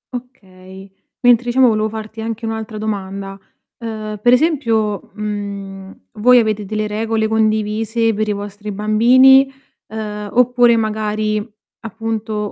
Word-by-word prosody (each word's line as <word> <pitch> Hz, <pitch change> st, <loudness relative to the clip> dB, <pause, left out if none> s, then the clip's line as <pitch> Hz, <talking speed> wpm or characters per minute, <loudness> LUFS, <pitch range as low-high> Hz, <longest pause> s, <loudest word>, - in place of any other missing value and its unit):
Okay. 190 Hz, -6 st, -11 dB, 0.3 s
Mentre, 245 Hz, -1 st, +4 dB
diciamo, 250 Hz, +1 st, +4 dB
volevo 215 Hz, -1 st, 0 dB
farti 220 Hz, 0 st, -7 dB
anche 225 Hz, 0 st, -5 dB
un'altra 220 Hz, -1 st, -5 dB
domanda: 195 Hz, -2 st, -5 dB, 0.4 s
uhm, 215 Hz, -2 st, -6 dB
per 245 Hz, -, +4 dB
esempio, 230 Hz, -, +1 dB
mhmm, 200 Hz, -, -6 dB
voi 245 Hz, +4 st, +5 dB
avete 215 Hz, -3 st, +1 dB
delle 215 Hz, +1 st, -2 dB
regole 220 Hz, +1 st, -1 dB
condivise 220 Hz, +1 st, 0 dB
per 215 Hz, +1 st, -2 dB
i -, -, 0 dB
vostri 205 Hz, +1 st, -7 dB
bambini, 255 Hz, +6 st, +5 dB, 0.4 s
ehm, 210 Hz, -1 st, -6 dB
oppure 245 Hz, -1 st, +4 dB
magari 215 Hz, 0 st, -2 dB, 0.3 s
appunto 220 Hz, -1 st, -4 dB
215 Hz, 120 wpm, -18 LUFS, 210-230 Hz, 0.4 s, voi